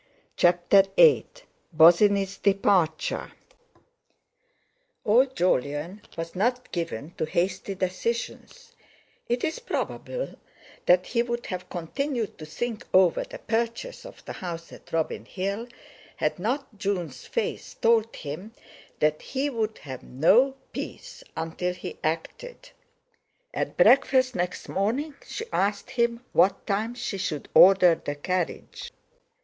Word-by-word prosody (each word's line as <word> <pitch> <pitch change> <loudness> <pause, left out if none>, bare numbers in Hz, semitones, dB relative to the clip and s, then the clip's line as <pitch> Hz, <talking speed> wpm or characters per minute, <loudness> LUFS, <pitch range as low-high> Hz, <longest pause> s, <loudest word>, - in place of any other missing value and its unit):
CHAPTER 175 +3 +5
VIII 485 -2 +6 0.5
BOSINNEY'S 195 +5 +5
DEPARTURE 195 -5 +1 1.7
Old 255 +5 +4
Jolyon 165 - 0 0.2
was 165 +1 -5
not 245 +6 0
given 165 -4 -4
to - - +1
hasty 185 +4 -1
decisions; 230 - -4 0.5
it 240 +1 0
is 320 - -1
probable - - -4 0.5
that 180 +1 +5
he 235 - +1
would 240 0 -3
have 185 -1 -5
continued 235 - -3
to 155 - -8
think 230 +7 -4
over 185 - +5
the - - -9
purchase 235 - -2
of - - -13
the - - -6
house 170 -2 -6
at - - -15
Robin 165 -1 -1
Hill, 200 +5 -3 0.5
had - - -1
not 235 +1 -3
Jun's 180 - -3
face 470 - -3
told 230 -1 +2
him 160 +9 -7 0.5
that 150 0 +2
he 280 +2 -2
would 220 -3 -2
have 130 -3 -8
no 220 - +3 0.2
peace - - -7
until 165 +3 -2
he - - -8
acted. 485 - -4 0.8
At - - -3
breakfast 260 -1 +5
next 180 0 -3
morning 245 +11 -1
she 450 - -5
asked 200 +1 0
him 235 0 0
what 185 +3 +3
time 215 +4 -1
she 220 -5 -4
should 150 -6 -3
order 185 -2 +8
the 145 - -3
carriage. 180 +4 -3
200 Hz, 120 wpm, -26 LUFS, 175-240 Hz, 1.7 s, order